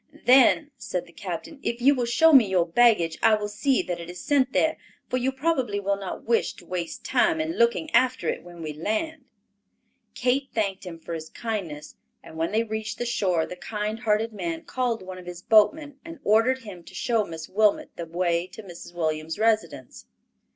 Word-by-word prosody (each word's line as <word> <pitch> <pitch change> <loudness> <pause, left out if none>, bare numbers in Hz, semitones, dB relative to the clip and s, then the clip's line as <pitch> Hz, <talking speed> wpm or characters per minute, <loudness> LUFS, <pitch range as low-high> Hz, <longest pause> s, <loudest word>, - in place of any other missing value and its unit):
"Then," 265 +4 +5
said 180 -6 -4
the - - -17
captain, 195 - -6
"if 235 - -2
you 270 +4 +5
will 250 -3 -1
show 320 +7 +5
me 245 -8 +7
your 180 -3 +2
baggage, 170 -4 +3
I 220 - +5
will 210 -1 -3
see 255 +6 +1
that 175 -1 -4
it 170 0 -8
is 180 0 -8
sent 275 -3 +2
there, 315 +3 +2 0.3
for 255 - -1
you 255 +1 0
probably 265 -7 0
will 200 0 0
not 195 -2 -6
wish 230 0 +1
to - - -16
waste 175 -2 -5
time 320 +6 +2
in 315 +1 -1
looking 235 +7 +2
after 255 0 +2
it - - -1
when 175 -1 -11
we 155 -1 -4
land." 235 - -3 0.9
Kate 260 +2 0
thanked 200 -4 -1
him 170 -2 -7
for 165 +1 -8
his 160 -1 -6
kindness; 180 -10 -5 0.3
and - - -12
when 165 +1 -1
they 220 +2 +2
reached 220 -1 -4
the 240 - -3
shore 185 -9 +1
the 180 - -8
kind 210 +3 -4
hearted 220 -1 0
man 170 -4 -4
called 245 -5 -2
one 185 0 -8
of 180 - -13
his 175 0 -8
boatmen 285 +6 +3
and 330 -2 -10
ordered 240 +5 +3
him 185 -5 -10
to - - -13
show 230 -3 +1
Miss 165 -4 -7
Wilmot 210 +1 +2
the 170 - -6
way 170 +1 0
to 220 - -11
Mrs. 175 -2 -11
Williams' 160 0 -2
residence. 210 - -1
215 Hz, 200 wpm, -25 LUFS, 175-250 Hz, 0.9 s, me